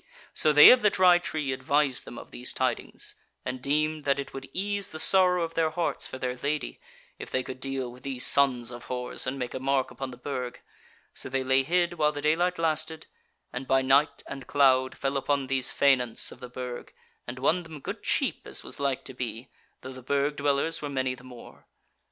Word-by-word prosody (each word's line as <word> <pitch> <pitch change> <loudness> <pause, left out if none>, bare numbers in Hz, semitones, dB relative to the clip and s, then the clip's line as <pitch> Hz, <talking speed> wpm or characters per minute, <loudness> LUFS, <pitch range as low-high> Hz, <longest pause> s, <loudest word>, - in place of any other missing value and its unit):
So 155 - +4
they 150 0 +10
of 250 - +5
the 210 - +5
Dry 180 -2 +5
Tree 155 -5 -3
advised 135 +1 0
them - - -10
of - - -11
these - - -2
tidings, - - -2 0.3
and 125 0 -4
deemed 155 +3 0
that 140 -1 +2
it 140 - -6
would 135 -1 -8
ease 200 +2 -2
the 155 - -7
sorrow 180 0 +5
of 165 0 -4
their 165 -1 +1
hearts 165 +2 -1
for - - -7
their 125 -1 -3
Lady 145 0 -3 0.4
if - - -7
they 130 - -1
could 130 0 -8
deal 135 -2 -4
with 125 +1 -15
these 130 -1 0
sons 125 -4 +3
of 120 0 -9
whores 125 -1 -2
and 130 +2 -2
make 125 -2 -4
a - - -4
mark 135 0 0
upon 135 -1 -6
the 125 - -10
Burg: 125 -1 -5 0.5
so - - -5
they 135 0 -1
lay 130 +1 +3
hid 175 +3 0
while 150 -1 +3
the 145 - -6
daylight 170 +5 +1
lasted, 160 0 -1 0.5
and 130 +1 -5
by 135 0 +3
night 140 +3 +3
and 135 -1 -8
cloud 130 -2 +3
fell 135 0 -1
upon 140 0 0
these 130 -1 +2
faineants 130 -4 +2
of - - -13
the 125 - -9
Burg, 125 0 -7 0.4
and 120 +1 -6
won 155 +7 +2
them 160 -3 -10
good - - -6
cheap, - - -1
as - - -2
was - - -8
like 140 -2 -1
to - - -8
be, 120 -1 -5 0.3
though 130 +1 -8
the 130 - -10
Burg 140 +3 0
dwellers 145 +3 0
were 145 - -4
many 130 -2 -1
the 125 - -13
more. 125 -2 -14
135 Hz, 215 wpm, -27 LUFS, 130-155 Hz, 0.5 s, they